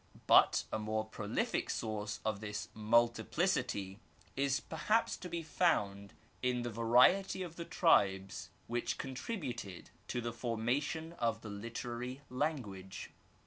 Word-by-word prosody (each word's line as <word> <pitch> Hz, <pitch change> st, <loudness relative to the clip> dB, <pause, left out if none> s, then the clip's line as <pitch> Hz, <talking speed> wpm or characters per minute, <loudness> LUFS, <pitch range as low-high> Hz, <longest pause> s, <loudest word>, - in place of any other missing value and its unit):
But -, -, +6 dB
a 110 Hz, -, 0 dB
more 110 Hz, 0 st, -1 dB
prolific 110 Hz, -1 st, -2 dB
source 105 Hz, -3 st, -3 dB
of 110 Hz, -2 st, 0 dB
this 105 Hz, 0 st, -5 dB
multiplicity 110 Hz, -3 st, +1 dB, 0.4 s
is 135 Hz, 0 st, +2 dB
perhaps 210 Hz, +8 st, +1 dB
to 180 Hz, -, -7 dB
be 170 Hz, -1 st, -3 dB
found 100 Hz, -, +1 dB, 0.3 s
in 125 Hz, -1 st, +1 dB
the 120 Hz, -, -3 dB
variety 125 Hz, -, +4 dB
of 170 Hz, -2 st, -7 dB
the 170 Hz, -, -5 dB
tribes 95 Hz, -, +2 dB, 0.2 s
which 120 Hz, 0 st, -2 dB
contributed 130 Hz, -, -5 dB, 0.2 s
to 125 Hz, -, -2 dB
the 120 Hz, -1 st, -3 dB
formation 130 Hz, +8 st, -1 dB
of 115 Hz, -1 st, 0 dB
the 110 Hz, -, -7 dB
literary 120 Hz, +4 st, -5 dB
language. 110 Hz, -, -3 dB
120 Hz, 125 wpm, -35 LUFS, 105-135 Hz, 0.4 s, But